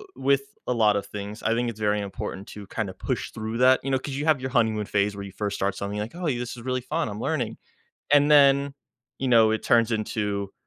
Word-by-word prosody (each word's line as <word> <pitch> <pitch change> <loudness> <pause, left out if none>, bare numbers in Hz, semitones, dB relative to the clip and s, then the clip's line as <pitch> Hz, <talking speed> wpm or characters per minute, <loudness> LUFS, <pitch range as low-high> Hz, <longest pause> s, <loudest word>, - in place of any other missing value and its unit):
with 140 +1 +2 0.2
a 125 - +1
lot 105 -3 +3
of 100 - -3
things, 105 +1 -7
I 115 - +2
think 120 0 0
it's 110 -1 -8
very 105 0 +1
important 100 0 -6
to 105 -2 -10
kinda 100 -4 -3
push - - -3
through 110 +1 -4
that, 130 +1 +6
you 135 - -3
know, 130 - +3
'cause 140 +1 -6
you 145 +2 -2
have 155 -4 +3
your 130 - -3
honeymoon 110 -4 +1
phase 100 0 0
where 100 - -6
you 95 - -9
first 100 +1 -3
start 100 0 -1
something 100 +1 -4
like, 110 +6 -5
"Oh, 180 - -7
y 140 -7 0
this 120 0 -5
is - - -9
really 130 -1 -1
fun. 155 +6 -2
I'm 105 +1 -6
learning." 125 -9 -2 0.6
And 145 +1 +5
then, 140 -1 +5 0.5
you 130 - -1
know, 115 -2 +6
it 110 - -1
turns 115 0 +3
into, 105 -2 -2
115 Hz, 250 wpm, -25 LUFS, 105-130 Hz, 0.6 s, that